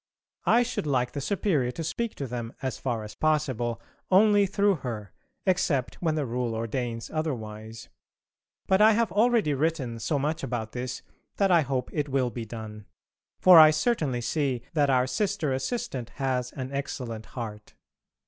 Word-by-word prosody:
I 240 - +5
should 240 -10 -3
like 125 -3 +1
the 140 - -4
Superior 160 -6 0
to 165 - -5
speak 225 +8 -3
to 140 - -4
them 120 -2 -5
as 130 -4 -3
far 120 -4 -2
as 105 0 -8
possible 130 -5 0 0.3
only 205 +1 +5
through 200 -1 +2
her, 115 -7 -6 0.3
except 175 -9 0
when 160 -3 +1
the 150 -2 -1
Rule 120 -1 -2
ordains 115 +1 -3
otherwise. 110 -8 -4 0.8
But 190 +1 +3
I 220 +1 +7
have 230 +1 +1
already 220 -6 +3
written 140 -5 -1
so 115 +7 0
much 150 +3 -1
about 115 -3 -3
this 125 0 -5 0.3
that 195 -2 +3
I 170 -2 +6
hope 130 -3 -2
it 150 -2 -1
will 130 -2 +1
be 115 -1 -5
done; 110 -2 -8 0.5
for 180 -3 +9
I 155 -1 +10
certainly 155 - 0
see 130 -2 -1
that 145 -3 +2
our 130 -1 +3
Sister 170 +1 -1
Assistant 130 - -3
has 130 -2 -1
an 130 0 -5
excellent 125 -5 -4
heart. 105 -3 -7
135 Hz, 165 wpm, -27 LUFS, 120-165 Hz, 0.8 s, I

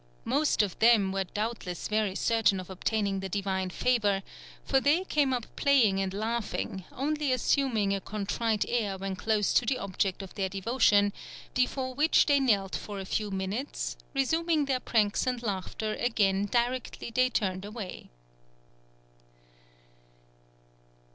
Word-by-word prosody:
Most 295 -7 +2
of 195 -4 -4
them 220 -4 +5
were 195 0 -1
doubtless 205 -3 -4
very 210 -3 0
certain 215 -4 +2
of 185 0 -8
obtaining 200 +1 -1
the 190 0 -5
divine 190 -1 -1
favour, 205 -2 +1 0.4
for 270 - +3
they 295 +7 +3
came 295 -7 +1
up 245 -3 -1
playing 235 -9 +3
and 190 -1 -1
laughing, 215 -3 -3
only 290 +1 -1
assuming 245 -5 +1
a 195 - -2
contrite 215 +2 -1
air 210 -5 -1
when 195 0 -4
close 210 +1 +1
to - - +4
the 255 +2 0
object 195 -2 -2
of 190 - -10
their 195 -2 -2
devotion, 205 0 +2 0.4
before 255 +1 0
which 300 +5 +4
they 285 -1 +4
knelt 205 -8 +1
for 205 -2 -6
a 190 - -5
few 210 +2 -2
minutes, 195 +8 -3 0.2
resuming 320 +3 +1
their 265 -2 0
pranks 215 -2 +1
and 250 -1 -1
laughter 210 +1 -3
again 205 -5 +1
directly 240 +1 -1
they 255 +1 +3
turned 190 -6 -1
away." 210 -2 -7
215 Hz, 140 wpm, -29 LUFS, 195-255 Hz, 0.4 s, them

